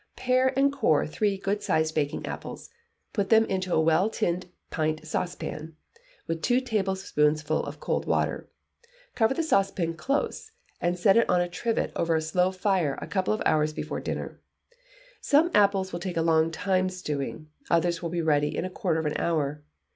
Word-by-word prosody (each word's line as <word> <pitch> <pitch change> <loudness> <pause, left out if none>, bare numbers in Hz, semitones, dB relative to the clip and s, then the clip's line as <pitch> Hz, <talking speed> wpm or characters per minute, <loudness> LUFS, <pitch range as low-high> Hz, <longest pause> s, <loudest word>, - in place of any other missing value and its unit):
Pare 255 0 +2
and 280 +1 +3
core 215 - +2
three 200 +5 0
good 200 +2 -2
sized 155 0 +1
baking 145 -2 -1
apples, - - -7 0.4
put 200 -2 -1
them 225 0 +6
into 185 -2 -2
a - - +3
well 165 +6 +3
tinned 180 -4 -1 0.2
pint 155 0 -1
saucepan, 160 -1 -4 0.5
with 165 0 -3
two 245 +6 +3
tablespoonfuls 190 - 0
of - - -7
cold - - -2
water; - - 0 0.6
cover 230 +3 +2
the 330 - 0
saucepan 195 - +1
close, 280 - -2 0.3
and 175 +1 0
set 195 +3 +4
it 230 - +3
on 180 - +4
a 175 - +1
trivet 225 +6 -1
over 170 -1 +1
a 160 - +1
slow 180 +3 +2
fire 185 -6 0
a - - -6
couple 190 -2 -1
of 215 - -1
hours 155 0 +2
before - - -4
dinner, - - -5 0.8
some 310 +4 +3
apples 195 -2 +3
will 175 - -3
take 180 -1 -4
a 165 - +2
long 160 -1 +3
time 185 +2 0
stewing, 150 -4 -5 0.2
others 170 0 +2
will 170 - -3
be 170 0 -2
ready 150 -2 +1
in - - -1
a 185 - -5
quarter 170 -4 -1
of 160 - -3
an 150 - -1
hour. 150 -3 -1
180 Hz, 180 wpm, -27 LUFS, 160-200 Hz, 0.8 s, them